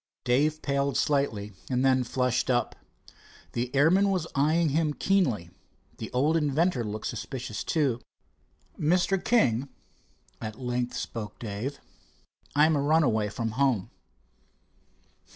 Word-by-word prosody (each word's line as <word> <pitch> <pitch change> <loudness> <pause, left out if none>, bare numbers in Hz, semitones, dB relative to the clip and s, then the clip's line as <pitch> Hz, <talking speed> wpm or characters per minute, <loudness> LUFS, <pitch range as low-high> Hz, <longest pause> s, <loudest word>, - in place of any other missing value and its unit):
Dave 145 +5 +1
paled 140 0 0
slightly, 115 -8 0 0.2
and 130 0 +1
then 130 -1 +4
flushed 125 0 0
up. 120 -1 +1 0.8
The 120 +1 -2
airman 180 +8 +4
was 185 -4 0
eyeing 155 +4 +2
him 150 0 +1
keenly. 130 - +1 0.5
The - - -5
old 145 +6 +2
inventor 150 -2 +1
looked 105 0 -5
suspicious, 125 -5 -4
too. 135 -7 0 0.8
"Mr. 180 +4 +2
King," 135 - +2 0.7
at 110 +2 -6
length 125 -1 -2
spoke 105 -3 -5
Dave, 115 +6 -5 0.8
"I 150 +1 +6
am 160 0 +3
a 140 - +1
runaway 140 -9 +2
from 115 0 -3
home." 125 -5 +1
135 Hz, 120 wpm, -27 LUFS, 120-155 Hz, 0.8 s, I